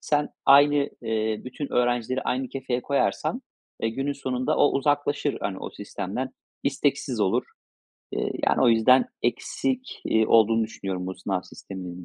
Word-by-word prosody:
sen 150 0 +1 0.2
aynı, 145 +1 +7 0.3
eee, 110 -1 -1
bütün 135 +3 -6
öğrencileri 125 +1 +1
aynı 130 0 -1
kefeye 130 -2 -3
koyarsan, 140 -1 0 0.4
eee, 115 - +2
günün 135 +5 -2
sonunda 130 -2 -1
o 145 - +5
uzaklaşır, 145 +1 +1
hani, 95 -2 -3
o - - -6
sistemden, - - -5 0.3
isteksiz - - 0
olur. - - +2 0.7
Eee, - - -1 0.2
yani, - - +2
o 125 - +6
yüzden 120 +3 +5 0.2
eksik, 255 - -2
eee, 110 0 +3
olduğunu 115 0 +4
düşünüyorum 95 -4 -5
bu 95 - -4
sınav 95 -1 -2
sisteminin 90 -1 -9
125 Hz, 145 wpm, -25 LUFS, 110-140 Hz, 0.7 s, aynı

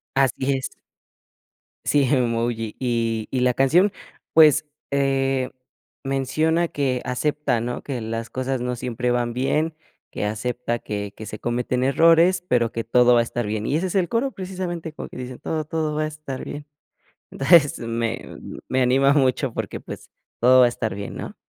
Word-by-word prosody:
Así 135 0 +2
es. 130 - -2 1.2
Sí, 145 -2 +3
Emoji. 115 -4 0
Y 115 -3 -1
y 130 - -1
la 125 -1 +3
canción, 175 +10 +4 0.4
pues, 155 -1 +6 0.3
eh, 135 -2 +1 0.5
menciona 155 +5 +1
que 130 -3 -1
acepta, 130 -1 0
¿no?, 120 +1 -4
que 130 -4 -4
las 115 0 -4
cosas 130 0 -2
no 125 0 -2
siempre 125 0 -2
van 120 -1 0
bien, 150 +6 0 0.4
que - - -4
acepta 120 +3 -2
que 100 -2 -5
que 110 - -8
se 105 - -7
cometen 125 +1 -1
errores, 165 +6 +4
pero 120 -2 +2
que 115 0 -4
todo 125 +1 +5
va 120 - +5
a - - +4
estar 120 -1 -3
bien. 105 0 -2
Y 145 - +1
ese 180 +4 0
es - - -5
el 180 -3 +2
coro, 245 +4 0
precisamente, 180 -5 -5
como - - -8
que - - -12
dice: 125 0 -7
"Todo, 155 -1 -3
todo 155 -1 -2
va 155 - 0
a - - 0
estar 150 -4 -6
bien". 145 +1 -7 0.7
Entonces, 145 0 +4
me 115 0 -3 0.3
me 130 0 +1
anima 135 +2 +4
mucho 130 -2 +1
porque, - - -4
pues, - - -9 0.3
todo 130 +2 +6
va - - +8
a - - +3
estar 110 -3 -3
bien, 100 0 -6
¿no? - - -7
130 Hz, 175 wpm, -23 LUFS, 120-150 Hz, 1.2 s, va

